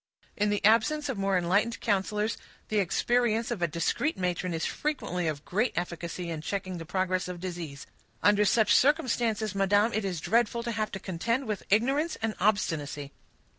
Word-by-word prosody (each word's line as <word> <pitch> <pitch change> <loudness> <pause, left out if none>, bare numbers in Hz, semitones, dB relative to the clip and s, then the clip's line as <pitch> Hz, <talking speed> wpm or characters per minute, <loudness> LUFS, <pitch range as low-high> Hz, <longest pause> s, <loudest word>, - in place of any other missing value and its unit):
"In 210 0 +1
the 205 -1 0
absence 280 +8 +3
of 260 - -2
more 195 -1 +2
enlightened 200 +6 +1
counselors, 210 +1 0 0.3
the 215 - +2
experience 230 +4 +1
of 220 -7 -3
a 170 - +3
discreet 170 - -1
matron 180 0 -1
is 165 -1 -2
frequently 180 - -2
of 150 -1 -3
great 215 +7 0
efficacy 170 0 -4
in 160 -2 -4
checking 185 +1 -4
the 165 - -8
progress 185 0 0
of 180 -1 -6
disease; 170 -6 -6 0.4
under 205 0 +5
such 215 +1 +4
circumstances, 240 - +2
madam, 205 +3 +3
it 220 - 0
is 185 -4 -2
dreadful 235 +6 +1
to 235 - -2
have 215 -1 -1
to 195 - -4
contend 230 +9 -1
with 210 -4 -3
ignorance 270 - +2
and 225 -1 -1
obstinacy." 150 -8 0
205 Hz, 170 wpm, -28 LUFS, 180-230 Hz, 0.4 s, under